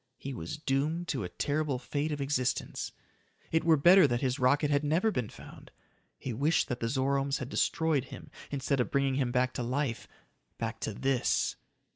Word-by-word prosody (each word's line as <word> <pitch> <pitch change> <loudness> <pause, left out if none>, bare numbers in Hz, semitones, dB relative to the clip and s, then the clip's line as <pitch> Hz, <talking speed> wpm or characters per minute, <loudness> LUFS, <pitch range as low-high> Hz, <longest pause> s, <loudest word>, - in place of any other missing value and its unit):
He 140 - -6
was 85 - -5
doomed 155 +4 -1
to 130 -7 -1
a 90 - -4
terrible 145 -2 -1
fate 145 +4 -2
of 150 - -3
existence! 135 -2 -1 0.6
It 160 0 +2
were 165 -2 +5
better 175 +3 +7
that 120 -2 -1
his 130 -2 0
rocket 140 +3 +3
had 145 0 +2
never 165 +9 +2
been 125 - -2
found. - - -13 0.5
He 130 - -5
wished 150 +9 +1
that 125 - -2
the 115 - -1
Zoromes 135 +1 +1
had 130 - -5
destroyed 160 -4 +1
him - - -11 0.2
instead 140 -1 -1
of 125 - +1
bringing 140 -1 +1
him 130 -2 0
back 125 0 +1
to - - -3
life 120 -3 -2 0.5
back 115 0 -4
to 110 - -3
this! 135 0 +1
140 Hz, 185 wpm, -30 LUFS, 125-150 Hz, 0.6 s, better